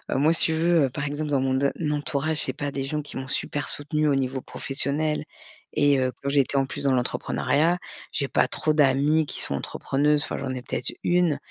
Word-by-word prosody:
moi, 150 +5 +4
si - - +4
tu 160 - +1
veux, 165 -3 +3
par 145 +3 -4
exemple, 145 +1 -3
dans 140 -2 +2
mon 130 0 +1
d 140 +1 +2 0.2
entourage, 150 +1 -1
j'ai 130 - -2
pas 145 +1 -4
des 135 -1 -3
gens 150 +3 -2
qui 145 - -8
m'ont 130 0 -5
super 145 +1 -2
soutenue 150 +1 -1
au 145 - +3
niveau 130 0 -1
professionnel 145 +4 -1 0.5
et 145 -2 +4
heu, 130 -1 +1
quand 140 - 0
j'étais 140 -1 +2
en 135 - +3
plus 145 +2 -6
dans 135 - +4
l'entrepreneuriat, 130 - +1 0.4
j'ai 140 -3 -1
pas - - +3
trop 155 - 0
d'amies 150 +2 +3
qui - - -4
sont 70 - 0
entrepreneuses. 145 - 0
Enfin, - - -4
j'en 135 - -4
ai 125 - -5
peut - - -3
être - - -3
1, 175 -4 +2
145 Hz, 220 wpm, -25 LUFS, 135-150 Hz, 0.5 s, moi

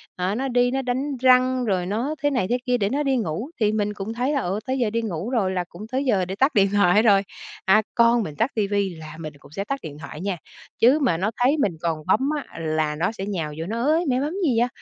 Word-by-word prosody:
ờ, 185 +3 -1
nó 270 +3 -1
đi 245 0 +2
nó 270 +1 0
đánh 265 +2 -2
răng 255 0 +4
rồi 185 -5 0
nó 235 +10 -2
thế 290 - +4
này 220 -9 0
thế 245 - +2
kia 250 -1 +2
để 200 -3 0
nó 285 +5 0
đi 270 -2 +1
ngủ. 215 - -3
Thì 210 - +3
mình 210 -1 -1
cũng 205 +2 -5
thấy 250 +5 -1
là, 280 - +1
ừ, 190 +4 -2
tới 260 0 -1
giờ 235 - +1
đi 230 +2 -1
ngủ 200 -1 -4
rồi 215 -7 +1
là 180 -1 -1
cũng 210 +6 -10
tới 265 +3 -2
giờ 195 -7 +2
để 190 +2 -5
tắt 270 +7 +2
điện 195 -1 +4
thoại 200 0 +5
rồi. 200 -3 +5 0.4
À, 200 +3 +5
con 235 -1 +4
mình 150 -4 -6
tắt 230 +5 0
ti 210 -2 +1
vi 200 -3 -1
là 155 -1 -10
mình 155 -2 -6
cũng 140 - -17
sẽ 195 +6 -3
tắt 275 +7 -3
điện 145 -2 -7
thoại 150 +1 -8
nha, 195 -2 -2 0.4
chứ 260 +7 +5
mà 180 - +2
nó 205 +5 0
thấy 280 +5 +4
mình 195 - 0
còn 160 -2 -2
bấm 260 +9 +2
á, 280 - -8
là 155 -1 -1
nó 175 +7 0
sẽ 195 -4 -6
nhào 165 -7 -3
vô 165 - -3
nó: 230 +5 -3
"Ới, 320 +5 +2
mẹ 255 0 +2
bấm 295 +4 -2
gì 245 -7 +2
vậy? 240 - +3
215 Hz, 280 wpm, -23 LUFS, 185-255 Hz, 0.4 s, thoại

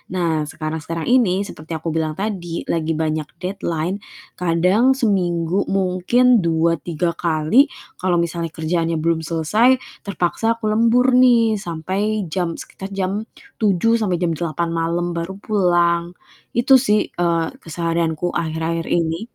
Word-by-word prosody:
Nah, 160 -4 0
sekarang-sekarang 160 +1 -4
ini 210 -6 +3
seperti 160 +2 -7
yang 160 - -6
aku 165 - -1
bilang 155 -1 -1
tadi 185 -4 -4
lagi 160 -1 -1
banyak 155 -1 -1 0.2
deadline, 180 0 -2 0.4
kadang 180 +10 +3
seminggu 180 -6 0
mungkin 195 +6 +3
2, 165 -1 +1
3 170 +2 -2
kali 170 - +3 0.3
kalau 180 -1 +1
misalnya 170 0 -2
kerjaannya 165 +1 -1
belum 165 -1 +2
selesai 185 +11 +3 0.3
terpaksa 200 +4 0
aku 215 -2 -2
lembur 235 +4 +3
nih 230 -4 +4
sampai 195 +5 -2
jam 175 -3 -1
sekitar 195 - -8
jam 195 +3 -2 0.3
07:00 220 +2 +2
sampai 190 -5 0
jam 175 -2 0
08:00 170 +1 -2
malam 170 +1 -1
baru 170 +3 -4
pulang. 175 -5 +2 0.5
Itu 265 +3 +6
sih, 210 -5 +3 0.2
eee, 170 -2 +1 0.2
keseharianku 165 0 -1
akhir-akhir 165 0 -2
ini 165 0 +1
175 Hz, 135 wpm, -20 LUFS, 165-205 Hz, 0.5 s, Itu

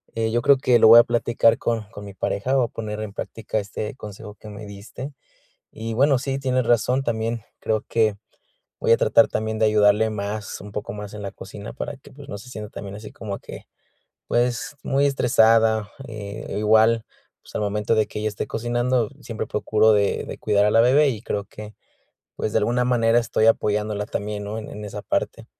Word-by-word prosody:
Eh, 110 0 0
yo 120 +1 +1
creo 140 +2 +5
que 125 -2 +3
lo 110 - +7
voy 115 +1 +11
a - - +7
platicar 115 -1 +2
con 115 -2 -1
con 100 - -9
mi 100 - -9
pareja, 125 +6 -1
voy 130 - +3
a - - -5
poner 105 -1 -5
en 110 -2 -5
práctica 110 +1 -4
este 105 +3 -5
consejo 105 -2 -10
que 105 +1 -12
me 105 +1 -9
diste. 105 +7 -9 0.6
Y, 115 0 -5
bueno, 135 +1 +4
sí, 135 0 -2
tienes 130 -2 0
razón, 125 +3 +2
también 115 -1 -2 0.2
creo 110 -1 0
que 110 -3 +2 0.7
voy - - +2
a - - +7
tratar - - +4
también 110 0 -2
de 110 - +4
ayudarle 105 +1 +4
más, 105 0 -4
un 105 0 -10
poco 105 -1 -4
más 105 -1 -8
en 105 - -7
la 100 - -5
cocina 100 +3 -9
para 145 +2 -5
que, - - -17
pues, 140 0 -13
no 100 - -5
se 125 +5 -12
sienta 105 -3 -7
también 100 -1 -8
así 105 +1 -9
como 100 -3 -6
que, - - -10 0.6
pues, 125 +5 0
muy 140 +1 +2
estresada, 110 -5 +3 0.2
eh, 105 -2 -7
igual, 110 +2 +4 0.4
pues, - - -17
al - - 0
momento 105 +2 0
de 110 -1 +2
que 105 - -6
ella 110 0 -1
esté 105 0 -5
cocinando, 120 0 0
siempre - - -5
procuro 110 0 +2
de 100 -1 +1
de - - -7
cuidar 100 0 +2
a 105 - +3
la 115 - +5
bebé 140 +4 +5
y, 110 -4 -4
creo 100 -3 -3
que, 105 +1 -11 0.6
pues, 105 - -2
de 110 - +3
alguna 120 +3 +1
manera 120 -2 +3
estoy 115 -1 +1
apoyándola 105 -1 +1
también, 105 0 -4
¿no?, 105 +2 -5
en 110 - -7
en 105 0 -8
esa 100 - -6
parte. - - -2
110 Hz, 210 wpm, -23 LUFS, 105-120 Hz, 0.7 s, voy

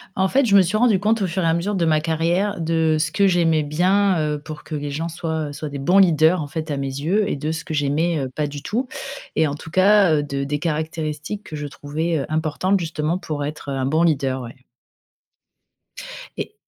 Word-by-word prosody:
En 190 +1 +2
fait, 270 +7 +2
je 205 -4 +3
me - - +8
suis 185 +3 0
rendu 215 -4 +4
compte 215 +2 +1
au 195 - +1
fur 185 +2 -2
et - - 0
à 165 - +3
mesure 175 +5 -1
de 175 -3 +1
ma 155 -1 +3
carrière 170 +5 0
de 160 -1 +1
ce 155 0 0
que 200 -1 +4
j'aimais 165 -4 +2
bien, 185 +5 +2
heu, 150 -1 -1
pour 155 -1 -8
que 155 - -5
les 145 -1 -4
gens 160 +4 -3
soient, 160 -2 -3
heu, - - -8
soient 150 +1 -5
des 140 -1 -6
bons 180 +8 +4
leaders 165 -1 +4
en 145 - -4
fait 160 +1 -5
à 145 - -1
mes 135 - -2
yeux, 170 +10 0
et - - -2
de 150 +3 -2
ce 165 +1 -5
que 160 - -6
j'aimais, 155 +3 +1
heu, 135 -2 -3
pas 150 +4 -2
du 145 -1 -7
tout. 240 - -2 0.5
Et 160 0 +4
en 145 - -3
tout 160 +2 -11
cas, 190 -1 +5
heu, 145 - +1
de 140 -1 -3
des 145 +1 -2
caractéristiques 155 +4 -3
que 155 - -8
je 150 -1 -4
trouvais, 150 +2 -2
importantes 160 +5 0
justement 160 0 -2
pour 150 -5 -4
être, 150 -1 -6
heu, - - -2
un 130 -1 -1
bon 155 +5 +2
leader, 135 -5 +1
ouais 125 +2 -11 1.7
et - - -5
160 Hz, 240 wpm, -21 LUFS, 150-180 Hz, 1.7 s, me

